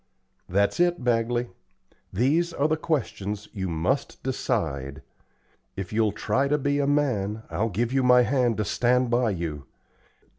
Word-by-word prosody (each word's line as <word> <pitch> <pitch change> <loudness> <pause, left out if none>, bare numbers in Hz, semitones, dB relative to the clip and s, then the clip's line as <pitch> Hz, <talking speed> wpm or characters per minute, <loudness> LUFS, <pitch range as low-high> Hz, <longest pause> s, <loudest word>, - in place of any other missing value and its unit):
"That's 100 - +1
it, 175 -4 +2
Bagley. 120 0 +1 0.6
These 155 - +1
are 145 -1 +1
the 155 - +1
questions 105 - -3
you 95 -4 -3
must 85 - -2
decide. 70 - -2 0.7
If 95 +1 -6
you'll 110 -1 +2
try 130 +6 0
to 150 +1 +2
be 145 0 0
a 140 - +1
man, 110 -8 0
I'll 115 +2 0
give 115 +5 -1
you 135 - +3
my 125 -1 +6
hand 125 -3 +1
to 105 - -1
stand 125 +3 +1
by 120 -1 +2
you. 80 -7 -4
120 Hz, 150 wpm, -25 LUFS, 100-140 Hz, 0.7 s, my